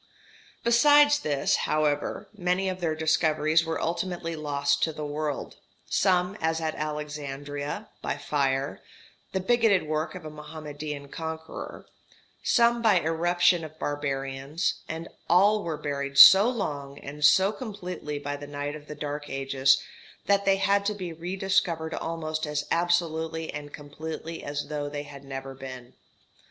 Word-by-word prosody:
] - - -27
Besides 290 +5 +6
this, 145 -2 +1
however, 150 -1 0
many 180 0 0
of 185 -1 -5
their 160 -2 0
discoveries 155 0 +2
were 165 0 -2
ultimately 170 -1 -2
lost 145 -2 0
to 160 - +2
the 150 -1 -6
world, 150 0 -3 0.3
some, 185 0 +2
as 160 0 +1
at 160 -1 -2
Alexandria, 145 -1 -5
by - - -2
fire 135 -1 -1 0.5
the 190 - 0
bigoted 225 -1 +3
work 155 +1 -2
of - - -8
a 155 - -6
Mohammedan 150 -1 -7
conqueror 160 +1 -6 0.6
some 235 -1 +3
by 215 -5 +5
irruption 170 +1 +2
of 155 0 -9
barbarians; 140 +2 -2
and 165 +1 -5 0.2
all 205 +4 +5
were 160 -3 -3
buried 140 -2 -3
so 195 +9 +10
long 145 - -4
and 145 +1 -8
so 190 +6 +6
completely 180 - -6
by 145 0 -4
the 145 0 -8
night 145 +1 -4
of 150 -1 -11
the 150 - -7
dark 145 0 -5
ages, 135 0 +2 0.4
that 200 0 +2
they 195 0 +5
had 200 +1 +2
to 210 - 0
be 180 -4 -5
rediscovered 175 -1 -1
almost 155 -1 -3
as 150 0 -2
absolutely 165 -2 0
and 145 0 -7
completely 155 +3 -7
as 145 0 -4
though 145 -1 -3
they 145 0 -4
had 140 -1 -11
never 135 0 -6
been. 130 -2 -9
155 Hz, 145 wpm, -27 LUFS, 145-175 Hz, 0.6 s, so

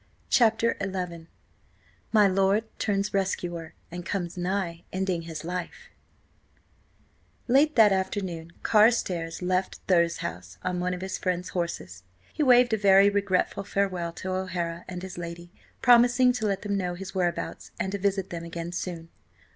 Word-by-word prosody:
CHAPTER 230 -1 +4
XI 180 -4 -4 0.8
MY 210 -2 +6
LORD 195 +3 +2 0.2
TURNS 200 -1 0
RESCUER 175 -4 -2 0.2
AND 175 +1 -6
COMES 175 -2 -3
NIGH 180 -2 -2
ENDING 185 -2 -1
HIS 165 -1 -7
LIFE 180 - -6 1.6
LATE 285 +5 +4
that 220 -3 +7
afternoon 190 -3 -2
Carstares 190 -7 +2
left 185 +1 -1
Thurze 170 -2 +3
House 90 +2 -6
on 180 -1 -1
one 180 0 -1
of 180 - -8
his 190 0 -4
friend's 180 -1 -2
horses. 95 - -4 0.3
He - - -3
waved 245 -4 +5
a - - +3
very 200 0 +6
regretful 200 -2 0
farewell 185 -4 -1
to 185 +2 -5
O'Hara 175 -2 -3
and 180 -1 -6
his 185 -2 -7
lady, 170 0 -7 0.3
promising 245 0 +6
to 220 -3 -1
let 195 -1 -1
them 205 -1 -1
know 180 -2 -2
his 190 +1 -8
whereabouts 180 -3 -2
and 190 - -1
to 200 - -3
visit 195 -1 0
them 170 -1 -5
again 170 0 -5
soon. 170 -2 -5
185 Hz, 150 wpm, -27 LUFS, 175-200 Hz, 1.6 s, that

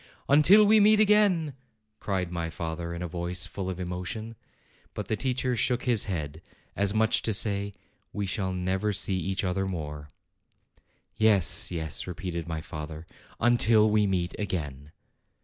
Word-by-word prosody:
"Until 165 +9 +6
we 215 +1 +5
meet 210 +1 +5
again!" 200 -8 +3 0.5
cried 95 -3 -3
my 85 -1 -3
father, 85 +1 -5
in 85 +1 -5
a - - -3
voice 90 +1 -1
full 95 +1 -6
of 95 -1 -5
emotion. 90 +5 -5 0.6
But - - -6
the 110 - +1
teacher 130 +1 -1
shook 120 +1 0
his 120 -5 +3
head, 80 -5 -5 0.3
as 100 0 +1
much 110 +1 +2
as - - -1
to 110 - -1
say, 100 -1 +1 0.4
"We 105 - -3
shall 95 0 -3
never 95 +3 -2
see 95 0 +3
each 95 +3 -2
other 95 +1 -1
more." 75 -5 -6 1.1
"Yes, 110 -3 +3
yes," 80 -2 -3
repeated 85 -1 -5
my 80 -1 -4
father, 80 0 -8 0.3
"until 115 -2 +4
we 105 -1 +2
meet 90 -2 -1
again!" 75 -8 -5
95 Hz, 155 wpm, -27 LUFS, 85-110 Hz, 1.1 s, Until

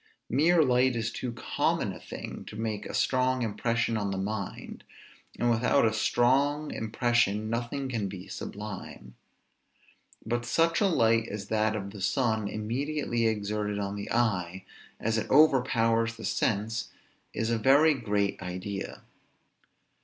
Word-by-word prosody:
Mere 160 +6 +4
light 125 -1 +3
is 115 -1 -1
too 125 - -4
common 115 - -1
a - - -10
thing - - -8
to - - -9
make 110 -1 -3
a - - -7
strong 130 -1 +1
impression 115 +1 0
on 100 -2 -1
the 95 - -2
mind, 100 0 -5 0.5
and 120 0 +2
without 120 +3 +3
a 110 - +2
strong 140 +7 +2
impression 110 -1 0
nothing 120 +4 -2
can 110 -6 -2
be 95 -1 -8
sublime. 100 -12 -7 1.1
But 120 +2 -1
such 165 - +2
a 205 - +5
light 115 -9 +3
as 100 -1 -6
that 110 0 +1
of 100 -2 -5
the 100 -1 -9
sun, 110 0 +1
immediately 120 +3 -1
exerted 105 -1 -1
on 100 0 -3
the 100 0 -6
eye, 95 -6 0 0.3
as 115 +1 0
it - - -5
overpowers 115 -6 +4
the - - -8
sense, 110 +2 -1 0.4
is 110 +1 -1
a 115 - +1
very 145 +6 +5
great 105 -7 -1
idea. 95 +2 -5
115 Hz, 145 wpm, -28 LUFS, 105-125 Hz, 1.1 s, a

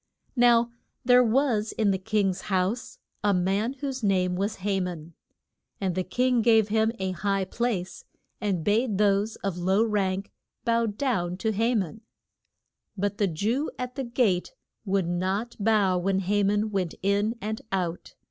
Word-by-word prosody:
Now 240 -1 +4 0.3
there 250 0 +6
was 230 -3 +1
in 215 -3 +2
the 190 - -1
king's 195 -2 0
house 195 +5 -1 0.3
a 205 -2 +3
man 195 +7 0
whose 270 -1 -5
name 185 -3 +1
was 200 +4 -1
Ha 195 -1 +1
man. 170 -3 -5 0.7
And 190 -3 -1
the 185 +1 -1
king 250 +5 +1
gave 220 -2 +4
him 220 +1 +2
a 190 -1 -2
high 195 +2 -1
place, 200 -3 -3 0.4
and 190 -6 -1
bade 215 +1 +1
those 205 +1 +2
of 190 -3 -2
low 190 +5 +3
rank 195 -3 -1 0.3
bow 230 0 +2
down 205 -6 -1
to 220 +3 0
Ha 225 +4 +1
man. 210 +1 -2 1.0
But 205 +1 -2
the 205 - +3
Jew 220 - -1
at 250 0 -4
the 270 - -3
gate 235 -7 0 0.3
would 195 -3 +1
not 190 +7 -1
bow 200 -4 +3
when 190 +1 0
Ha 205 +2 +1
man 210 +2 +1
went 185 -4 -1
in 205 +3 +1
and 215 +1 -4
out. 180 -3 -3
205 Hz, 160 wpm, -26 LUFS, 190-225 Hz, 1.0 s, there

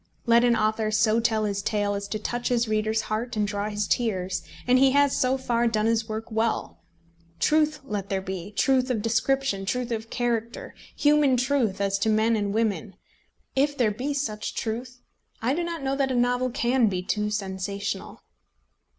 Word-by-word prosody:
Let 235 0 +5
an 240 -1 +4
author 215 0 +1
so 215 +1 +3
tell 220 -2 +1
his 200 -1 -1
tale 205 -1 0
as 200 0 -4
to 215 - -3
touch 240 +3 -3
his 240 -1 +1
reader's 215 +1 0
heart 220 +2 -3
and 210 -1 +1
draw 205 0 -2
his 210 -1 -2
tears, 190 -6 0 0.2
and 250 +1 +4
he 265 0 +5
has, 285 -1 +4
so 255 +1 +2
far, 240 -2 +1
done 215 -2 +1
his 225 0 +1
work 220 +1 -5
well. 225 +1 -1 0.6
Truth 305 -1 +2
let 205 -6 -4
there 195 - 0
be, 190 0 -6
truth 260 +4 +2
of 225 -5 -1
description, 230 -1 +1
truth 245 +4 -2
of 225 0 -3
character, 235 -2 -2 0.2
human 290 -3 +4
truth 245 -6 +1
as 195 0 0
to 220 - +1
men 220 +1 +3
and 205 -2 -1
women. 205 -3 -1 0.6
If 285 +2 +1
there 230 -4 +2
be 250 +7 -3
such 215 -7 -3
truth, 245 +2 -4 0.4
I 240 +4 0
do 345 +4 -1
not 335 -3 -4
know 270 0 0
that 275 -1 +1
a 260 - -1
novel 245 +1 +1
can 240 0 +2
be 185 -3 -2
too 210 +2 -1
sensational. 200 -1 -4
225 Hz, 185 wpm, -26 LUFS, 210-250 Hz, 0.6 s, Let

